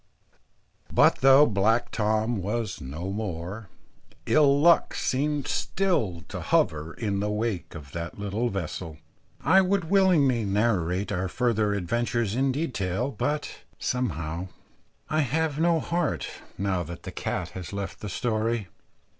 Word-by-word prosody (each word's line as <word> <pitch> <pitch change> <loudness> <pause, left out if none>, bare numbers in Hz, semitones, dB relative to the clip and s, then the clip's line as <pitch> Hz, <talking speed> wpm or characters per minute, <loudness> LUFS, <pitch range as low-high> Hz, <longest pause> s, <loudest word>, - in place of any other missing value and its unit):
But - - +5
though 135 +2 +7
black 115 +2 +1
Tom 110 +1 +1
was 105 +3 -3
no 80 +9 -5
more, 100 0 -5 0.6
ill 145 -2 +4
luck 170 +2 +4
seemed 145 +2 0
still 115 - 0
to - - -6
hover 80 +2 +1
in 100 -4 -2
the 105 +1 -1
wake 105 -5 -2
of 70 -5 -10
that 85 +2 -5
little 105 +4 -1
vessel. 85 -4 -5 0.4
I 190 - +5
would 190 -2 0
willingly 160 - +4
narrate 100 -3 0
our 95 +1 -1
further 110 -1 +1
adventures 120 +3 -1
in 135 +3 +2
detail, 125 - -2
but 150 +2 -2 0.2
somehow 85 - -2 0.6
I 155 - 0
have 155 +1 0
no 165 0 +3
heart, 170 0 -1 0.3
now 95 -2 0
that 85 +1 -7
the - - -6
cat - - -3
has 90 -2 -8
left 100 -1 -5
the 105 - -6
story. 110 0 -1
110 Hz, 135 wpm, -26 LUFS, 95-135 Hz, 0.6 s, though